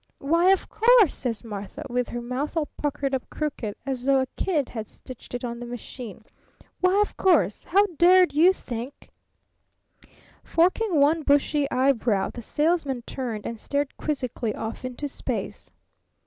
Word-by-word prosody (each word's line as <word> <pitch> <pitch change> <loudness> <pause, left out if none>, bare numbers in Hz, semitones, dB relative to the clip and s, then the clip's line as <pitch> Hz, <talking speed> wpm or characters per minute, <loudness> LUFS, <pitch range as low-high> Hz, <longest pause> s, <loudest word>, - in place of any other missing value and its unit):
'Why, 335 +6 +3
of 385 -1 +3
course,' 450 - +5
says 235 -3 -4
Martha, 215 +6 -7
with 250 -1 -1
her 240 0 -5
mouth 265 +7 -3
all 315 - +1
puckered 285 -2 -2
up 260 - -2
crooked, 280 -9 -4
as 265 -3 -3
though 270 0 +4
a 260 - +1
kid 305 -8 0
had 220 -3 -6
stitched 255 -1 -11
it 245 - -5
on 235 -1 -4
the 240 - -6
machine. 240 -3 -8 0.5
'Why, 370 +2 +3
of 415 - -1
course! 215 - +2
How 400 +4 +4
dared 360 0 +6
you 330 +5 +6
think 250 -6 -7 0.6
'" - - -51 0.7
Forking 360 +1 +2
one 305 +3 +4
bushy 285 0 +2
eyebrow, 250 -6 +1
the 240 - -7
Salesman 295 -2 0
turned 235 -5 -5
and 230 -1 -5
stared 285 +2 -2
quizzically 255 -7 -3
off 220 +3 -5
into 255 +3 -4
space. 275 - -5
275 Hz, 160 wpm, -25 LUFS, 240-320 Hz, 0.7 s, dared